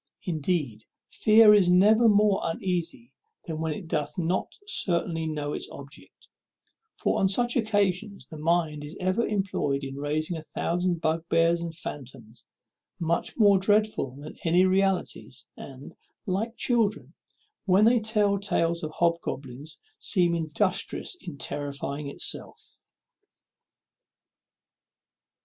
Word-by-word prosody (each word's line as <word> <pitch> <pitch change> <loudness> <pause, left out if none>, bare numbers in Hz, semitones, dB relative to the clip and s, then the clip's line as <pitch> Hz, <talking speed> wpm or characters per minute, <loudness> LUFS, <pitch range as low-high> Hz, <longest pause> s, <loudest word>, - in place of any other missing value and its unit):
Indeed, 155 - -2 0.3
fear 215 0 +6
is 195 -4 +4
never 215 +6 +5
more 205 -1 +3
uneasy 165 -7 -3 0.3
than 160 -1 -5
when 160 -1 -1
it 170 +3 -6
doth 150 -2 -2
not 175 +1 -2
certainly 170 - -1
know 150 -2 -3
its - - -4
object; 140 +1 -12 0.7
for - - 0
on 195 - +3
such 240 +5 +1
occasions 205 -3 0
the 155 -3 -10
mind 160 -2 0
is 150 +6 -9
ever 185 +5 0
employed 185 -9 -1
in 135 0 -6
raising 155 +4 -2
a 160 - -5
thousand 175 +2 -2
bugbears 165 +1 +1
and 170 -1 -4
fantoms, 120 -5 -9 0.6
much 170 0 -2
more 205 -4 +5
dreadful 205 -9 +1
than 145 +2 -9
any 175 +2 +4
realities, 190 -8 -1
and, 135 0 -11 0.3
like 215 +5 -2
children 225 -4 0 0.5
when 195 +2 +4
they 235 +1 +5
tell 210 -2 +1
tales 170 -4 0
of 155 - -4
hobgoblins, 150 -4 -2 0.2
seems 175 -3 +1
industrious 175 - -1
in 170 -6 -8
terrifying 140 +1 -4
itself. - - -3
170 Hz, 120 wpm, -26 LUFS, 150-200 Hz, 0.7 s, fear